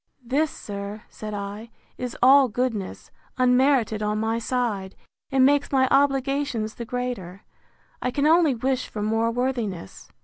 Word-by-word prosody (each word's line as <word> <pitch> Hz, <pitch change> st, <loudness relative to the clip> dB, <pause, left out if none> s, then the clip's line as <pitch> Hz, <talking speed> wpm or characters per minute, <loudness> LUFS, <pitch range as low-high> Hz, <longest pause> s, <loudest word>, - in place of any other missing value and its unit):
This, 290 Hz, +6 st, +1 dB
sir, 205 Hz, -1 st, -7 dB
said 215 Hz, -1 st, -7 dB
I, 205 Hz, +3 st, -6 dB, 0.3 s
is 250 Hz, -1 st, -5 dB
all 270 Hz, +1 st, +7 dB
goodness, 230 Hz, -4 st, -3 dB, 0.3 s
unmerited 250 Hz, -3 st, +3 dB
on 210 Hz, 0 st, -1 dB
my 225 Hz, +1 st, 0 dB
side; 225 Hz, -6 st, -2 dB, 0.3 s
and 265 Hz, -2 st, +4 dB
makes 285 Hz, +1 st, +2 dB
my 260 Hz, -1 st, +3 dB
obligations 275 Hz, -4 st, +1 dB
the 235 Hz, -, -7 dB
greater. 225 Hz, -7 st, -5 dB, 0.6 s
I 250 Hz, -, 0 dB
can 280 Hz, +3 st, 0 dB
only 320 Hz, -3 st, +4 dB
wish 255 Hz, +2 st, -1 dB
for 210 Hz, -, -5 dB
more 225 Hz, +2 st, +1 dB
worthiness. 230 Hz, -, -3 dB
245 Hz, 140 wpm, -24 LUFS, 215-265 Hz, 0.6 s, all